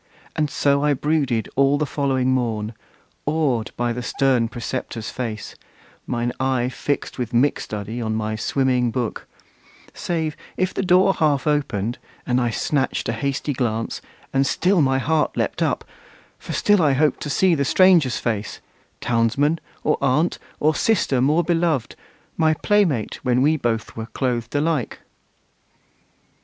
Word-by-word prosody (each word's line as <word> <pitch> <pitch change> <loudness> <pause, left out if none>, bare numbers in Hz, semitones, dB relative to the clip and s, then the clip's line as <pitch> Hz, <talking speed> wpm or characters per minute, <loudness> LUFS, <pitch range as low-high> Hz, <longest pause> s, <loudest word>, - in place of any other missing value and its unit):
And 150 -1 0
so 140 0 +1
I 150 -1 +3
brooded 135 -6 0
all 140 +1 +4
the 150 - 0
following 135 -3 0
morn, 115 -4 -1 0.5
Awed 145 -7 +1
by 120 0 0
the 125 - -4
stern 125 -1 +1
preceptor's 120 -1 -5
face, 115 -4 -5 0.5
mine 120 0 -1
eye 130 -2 +1
Fixed 140 +1 -3
with 125 0 -3
mick 130 +5 +3
study 110 +3 -5
on 110 -1 -1
my 110 0 -2
swimming 125 +1 +1
book: 120 -1 -3 0.7
Save 160 -3 -2 0.2
if 185 0 0
the - - -1
door 185 +1 +4
half 145 -6 +1
opened, 135 -7 -1 0.3
and 125 +1 +1
I 120 - +1
snatched 135 +3 -1
A - - 0
hasty 140 +4 -2
glance, 115 -3 -2 0.3
and 135 0 +2
still 185 -1 +2
my 135 -2 +2
heart 155 +3 0
leaped - - -1
up, - - 0 0.6
For - - -8
still 205 -3 +3
I 145 -4 +4
hoped 150 +3 +1
to 150 - -4
see 185 +5 +3
the 140 -3 +1
stranger's 170 -3 +4
face, 110 -3 -3 0.4
Townsman, 120 +7 +1 0.2
or 150 - +1
aunt, 140 +5 +1 0.2
or 155 +1 +3
sister 150 - +1
more 150 +6 +3
beloved, 165 -7 0 0.4
My 155 -1 +3
play 205 +5 +3
mate 130 - -2
when 125 0 +2
we 155 +2 +4
both 115 -6 -2
were 110 0 -5
clothed 125 -1 -2
alike! 150 -4 -1
135 Hz, 150 wpm, -22 LUFS, 120-150 Hz, 0.7 s, all